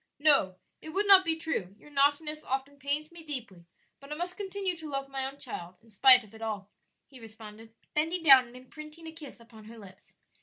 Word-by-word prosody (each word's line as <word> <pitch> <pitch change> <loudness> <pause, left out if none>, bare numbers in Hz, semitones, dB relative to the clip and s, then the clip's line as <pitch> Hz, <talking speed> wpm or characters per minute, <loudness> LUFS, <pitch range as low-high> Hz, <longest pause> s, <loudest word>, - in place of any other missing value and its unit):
"No, 280 -11 +3 0.3
it 315 - -10
would 390 +6 -1
not 390 -2 +8
be 325 -2 -1
true; 210 - -4
your 295 - -18
naughtiness 295 +2 +1
often 270 +2 -4
pains 290 +3 -1
me 340 -1 -12
deeply, 240 - -8 0.3
but 275 +1 -14
I - - -3
must 355 +3 -4
continue 385 -2 -2
to 315 -1 -9
love 275 -1 -4
my 270 -1 0
own 275 +1 -6
child 180 -9 -6
in 225 - -21
spite 250 +4 +7
of 215 - -19
it 220 - -14
all," 210 -3 -5 0.3
he 265 - -16
responded, 220 0 -13 0.2
bending 325 +3 -1
down 265 -5 +7
and 240 - -16
imprinting 305 +5 -12
a 320 - -7
kiss 310 -6 -11
upon 230 -2 -16
her 230 +2 -12
lips. 190 -3 -16
275 Hz, 215 wpm, -29 LUFS, 225-315 Hz, 0.3 s, not